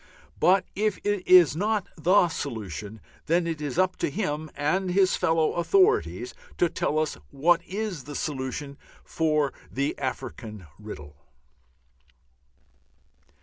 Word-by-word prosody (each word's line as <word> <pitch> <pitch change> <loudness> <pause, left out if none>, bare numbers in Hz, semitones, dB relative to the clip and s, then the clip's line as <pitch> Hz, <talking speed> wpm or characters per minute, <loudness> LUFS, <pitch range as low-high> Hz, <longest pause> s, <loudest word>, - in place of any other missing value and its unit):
But 185 +1 +4
if 210 0 0
it 205 -3 -1
is 175 -6 +7
not 210 +2 0
the 180 +3 +4
solution, 110 - -6 0.3
then 170 +2 +2
it 165 -2 -3
is 145 0 -4
up 185 0 +2
to - - -1
him 155 -3 -3
and 170 +6 0
his 185 +1 +3
fellow 160 -1 +2
authorities 390 - +2 0.2
to 175 - +3
tell 155 - -1
us 155 - -1
what 170 +5 +2
is 195 -8 -4
the 145 0 -7
solution 140 0 -4 0.4
of 150 -3 +2 0.2
the 140 +2 -1
African 110 -6 -5
riddle. 75 -9 -10
160 Hz, 125 wpm, -26 LUFS, 140-185 Hz, 0.4 s, is